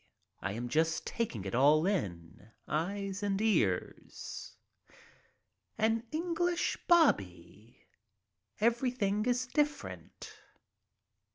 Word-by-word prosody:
I 100 Hz, -, -2 dB
am 120 Hz, +3 st, -4 dB
just 160 Hz, +5 st, +1 dB
taking 130 Hz, -, -3 dB
it 95 Hz, -, -4 dB
all 150 Hz, +5 st, +5 dB
in, 95 Hz, -, -3 dB, 0.2 s
eyes 195 Hz, +5 st, -2 dB
and 200 Hz, -1 st, 0 dB
ears. 160 Hz, -, -1 dB, 1.2 s
An 225 Hz, +1 st, +2 dB
English 345 Hz, +2 st, 0 dB
"bobby." 345 Hz, -2 st, +1 dB, 0.7 s
Everything 230 Hz, -2 st, +1 dB
is 250 Hz, +1 st, +1 dB
different. 295 Hz, +3 st, -3 dB
200 Hz, 85 wpm, -32 LUFS, -, 1.2 s, all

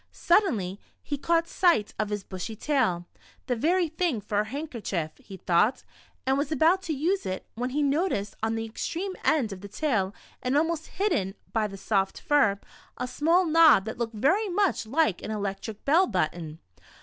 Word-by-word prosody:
Suddenly 215 Hz, -, +1 dB, 0.2 s
he 290 Hz, -, -2 dB
caught 330 Hz, +4 st, +1 dB
sight 340 Hz, -, +2 dB
of 215 Hz, -1 st, 0 dB
his 205 Hz, -2 st, -3 dB
bushy 190 Hz, +4 st, -6 dB
tail. 220 Hz, -, 0 dB, 0.2 s
" -, -, -28 dB
The 250 Hz, -, 0 dB
very 340 Hz, +8 st, +2 dB
thing 320 Hz, -5 st, -1 dB
for 205 Hz, 0 st, -1 dB
a 210 Hz, -, +1 dB
handkerchief," 220 Hz, -, -4 dB
he 195 Hz, -2 st, -11 dB
thought, 190 Hz, +8 st, +2 dB, 0.4 s
and 265 Hz, +1 st, +2 dB
was 285 Hz, +1 st, -2 dB
about 325 Hz, +5 st, +3 dB
to 320 Hz, -, -1 dB
use 350 Hz, +8 st, 0 dB
it, 185 Hz, 0 st, -4 dB
when 245 Hz, +3 st, -3 dB
he 295 Hz, +3 st, 0 dB
noticed 285 Hz, -, 0 dB
on 220 Hz, +1 st, 0 dB
the 225 Hz, 0 st, -2 dB
extreme 350 Hz, -, -4 dB
end 260 Hz, -9 st, +2 dB
of 185 Hz, -, -10 dB
the 200 Hz, -, -8 dB
tail, 205 Hz, -5 st, 0 dB, 0.3 s
and 255 Hz, +3 st, +1 dB
almost 325 Hz, +1 st, 0 dB
hidden 305 Hz, -, 0 dB, 0.2 s
by 220 Hz, -2 st, +1 dB
the 195 Hz, -1 st, -9 dB
soft 195 Hz, -1 st, 0 dB
fur, 225 Hz, -10 st, +3 dB, 0.4 s
a 250 Hz, -, -3 dB
small 330 Hz, +8 st, +2 dB
knob 315 Hz, -, +6 dB
that 220 Hz, +2 st, -6 dB
looked 230 Hz, -1 st, -3 dB
very 375 Hz, -, +2 dB
much 375 Hz, -, +1 dB
like 270 Hz, -, +1 dB
an -, -, -6 dB
electric 205 Hz, 0 st, -4 dB
bell 335 Hz, +7 st, +4 dB
button. 165 Hz, -4 st, -2 dB
250 Hz, 185 wpm, -27 LUFS, 205-320 Hz, 0.4 s, knob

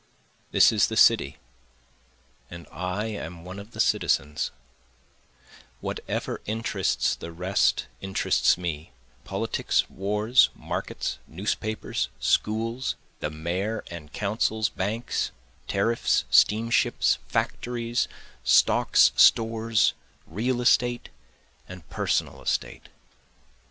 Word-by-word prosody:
This -, -, +6 dB
is 110 Hz, -1 st, +3 dB
the 110 Hz, -, -4 dB
city 80 Hz, -13 st, +4 dB, 1.1 s
and 85 Hz, 0 st, -10 dB
I 90 Hz, +5 st, -3 dB
am 90 Hz, -6 st, -6 dB
one 95 Hz, +2 st, -8 dB
of 100 Hz, +2 st, -11 dB
the -, -, -12 dB
citizens, 75 Hz, +2 st, +1 dB, 1.3 s
Whatever -, -, -4 dB
interests 110 Hz, +2 st, 0 dB
the 85 Hz, -, -8 dB
rest 90 Hz, +4 st, +1 dB, 0.2 s
interests 95 Hz, -2 st, +2 dB
me, 80 Hz, -6 st, -5 dB, 0.3 s
politics, -, -, 0 dB
wars, 105 Hz, +6 st, +3 dB
markets, -, -, -4 dB
newspapers, 105 Hz, +5 st, -3 dB
schools, 115 Hz, +4 st, 0 dB, 0.2 s
The 75 Hz, -, -2 dB
mayor 90 Hz, +8 st, -3 dB
and 75 Hz, -3 st, -9 dB
councils, 110 Hz, +2 st, 0 dB
banks, 110 Hz, +5 st, -2 dB, 0.4 s
tariffs, 115 Hz, +4 st, +1 dB
steamships, 115 Hz, +3 st, +3 dB
factories, 120 Hz, -1 st, -1 dB, 0.4 s
stocks, -, -, +5 dB
stores, 115 Hz, -1 st, +4 dB, 0.3 s
real 120 Hz, +8 st, -2 dB
estate 120 Hz, 0 st, +2 dB, 0.6 s
and 90 Hz, -2 st, -11 dB
personal -, -, -1 dB
estate. -, -, -3 dB
105 Hz, 95 wpm, -26 LUFS, 90-115 Hz, 1.3 s, This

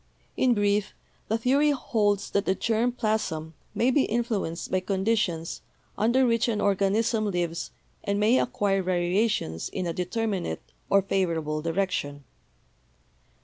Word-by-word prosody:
In 250 Hz, -2 st, +3 dB
brief, 205 Hz, 0 st, +1 dB, 0.3 s
the 220 Hz, -, +1 dB
theory 275 Hz, +6 st, +3 dB
holds 210 Hz, -7 st, 0 dB
that 200 Hz, +1 st, 0 dB
the 190 Hz, -, +2 dB
germ 230 Hz, +4 st, +1 dB
plasm 215 Hz, -9 st, -2 dB, 0.2 s
may 245 Hz, +3 st, +3 dB
be 270 Hz, +1 st, +3 dB
influenced 215 Hz, -8 st, -2 dB
by 185 Hz, -, +2 dB
conditions 190 Hz, -3 st, -1 dB, 0.3 s
under 240 Hz, +5 st, +3 dB
which 230 Hz, -1 st, +2 dB
an 220 Hz, -3 st, 0 dB
organism 210 Hz, +3 st, +1 dB
lives 175 Hz, -3 st, -2 dB, 0.3 s
and 200 Hz, 0 st, 0 dB
may 225 Hz, +5 st, +4 dB
'acquire' 200 Hz, -5 st, +1 dB
variations 180 Hz, -, 0 dB
in 185 Hz, -, -3 dB
a 170 Hz, -, -2 dB
determinate 180 Hz, -, -2 dB, 0.3 s
or 195 Hz, -1 st, +4 dB
favorable 165 Hz, -6 st, -1 dB
direction. 165 Hz, -4 st, -2 dB
200 Hz, 130 wpm, -26 LUFS, 180-225 Hz, 0.3 s, may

